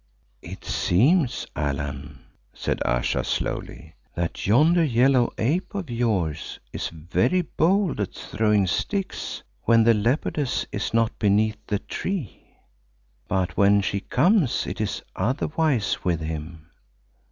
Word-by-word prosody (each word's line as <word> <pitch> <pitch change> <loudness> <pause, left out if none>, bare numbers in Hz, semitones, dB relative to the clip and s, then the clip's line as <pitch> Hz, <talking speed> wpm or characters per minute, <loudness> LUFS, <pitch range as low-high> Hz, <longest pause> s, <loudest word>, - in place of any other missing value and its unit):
"It - - -10
seems, 130 - +2
Allan," 70 -2 -4 0.3
said - - -2
Ayesha - - 0
slowly, - - -4 0.2
"that 85 +1 -3
yonder 155 - +5
yellow 125 -2 +3
ape 160 - -1
of 185 -10 -4
yours 100 -10 -1
is - - -3
very 95 - 0
bold 175 - +1
at 100 - -3
throwing 105 -2 +1
sticks 195 - -3 0.2
when 115 -1 +5
the 115 +1 +6
leopardess 125 +5 0
is 105 - -3
not 115 0 +1
beneath 105 +1 +2
the 105 - 0
tree. 155 - -5 0.8
But 95 -2 -1
when 100 0 +5
she 100 0 -1
comes 155 - +2
it 95 +4 -4
is 105 - -2
otherwise 135 - 0
with 85 -3 0
him. 80 +1 -6
110 Hz, 120 wpm, -24 LUFS, 90-140 Hz, 0.8 s, the